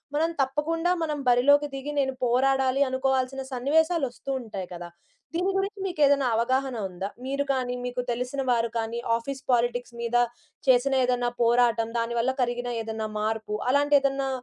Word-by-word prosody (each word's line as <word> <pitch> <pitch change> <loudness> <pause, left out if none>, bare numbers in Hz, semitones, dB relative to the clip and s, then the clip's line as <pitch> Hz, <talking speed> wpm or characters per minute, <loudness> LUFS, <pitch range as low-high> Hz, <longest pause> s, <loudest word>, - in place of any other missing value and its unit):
మనం 320 +2 +2
తప్పకుండా 320 +6 0
మనం 300 -2 -2
బరిలోకి 285 +4 +5
దిగి 275 +2 -4
నేను 265 -1 +1
పోరాడాలి 265 +2 +2
అనుకోవాల్సిన 265 0 0
సన్నివేశాలు 315 +5 +2
వస్తూ 275 +2 -7
ఉంటాయి 195 -6 -6
కదా! 175 0 -7 0.5
దీని 365 +3 +1
గురించి 395 +1 -2
మీకు 350 -4 -4
ఏదైనా 280 -2 +3
అవగాహన 260 +2 0
ఉందా? 190 +2 -5 0.2
మీరు 275 +2 -1
కానీ 250 -1 -2
మీకు 250 0 -2
తెలిసిన 250 +3 -2
వారు 235 -1 +1
కానీ 225 +1 -3 0.2
ఆఫీస్ 270 +3 -6
పాలిటిక్స్ 245 0 0
మీద 235 0 -2 0.5
చేసిన 260 +2 +4
ఏదన్నా 245 -1 +1
పోరాటం 235 -1 +3
దానివల్ల 235 +2 0
కలిగిన 245 0 -1
ఏదన్నా 220 0 -4
మార్పు 215 0 -2
అలాంటి 285 +2 +3
ఏదన్నా 275 0 0
260 Hz, 150 wpm, -26 LUFS, 235-275 Hz, 0.5 s, బరిలోకి